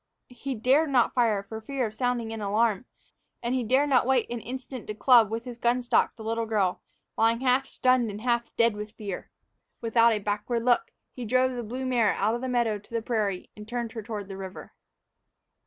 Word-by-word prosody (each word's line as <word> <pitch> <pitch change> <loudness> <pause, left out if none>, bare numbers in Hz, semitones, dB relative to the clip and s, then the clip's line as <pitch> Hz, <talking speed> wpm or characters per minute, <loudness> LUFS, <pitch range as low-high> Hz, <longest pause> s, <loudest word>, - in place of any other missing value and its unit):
He 265 +1 -4
dared 270 +7 +3
not 250 -4 +3
fire 225 -5 +2
for 220 +2 -8
fear 265 +2 -2
of 215 - -5
sounding 235 -1 -1
an 225 - -5
alarm, 210 +1 +1 0.6
and 235 +1 0
he 255 -1 0
dared 265 +6 +2
not 255 -2 +3
wait 260 -3 +2
an 240 - -2
instant 255 +1 -7
to 210 - -4
club 235 -1 +6
with 225 +2 -4
his 240 -1 -8
gun 245 +1 +1
stock 240 - +2
the 225 - -10
little 225 +1 -2
girl, 200 -5 0 0.4
lying 230 +1 +3 0.3
stunned 255 -4 +2
and 205 +1 -7
half 235 -1 0
dead 230 -2 +3
with 210 +1 -7
fear. 205 -5 -6 0.5
Without 230 0 +4
a 220 - +1
backward 210 +3 -2
look, 245 -1 +3 0.2
he 250 - -7
drove 255 +3 +2
the 245 -1 -4
blue 250 +4 -5
mare 240 -5 +2
out 210 +3 +1
of 240 - -3
the 260 - -3
meadow 235 -4 +1
to 205 - -23
the 230 -1 -2
prairie 210 -6 -2
and 210 0 -10
turned 240 -1 -3
her 225 - -6
toward 210 -2 -6
the 195 -1 -7
river. 190 -1 -8
230 Hz, 210 wpm, -27 LUFS, 215-250 Hz, 0.6 s, club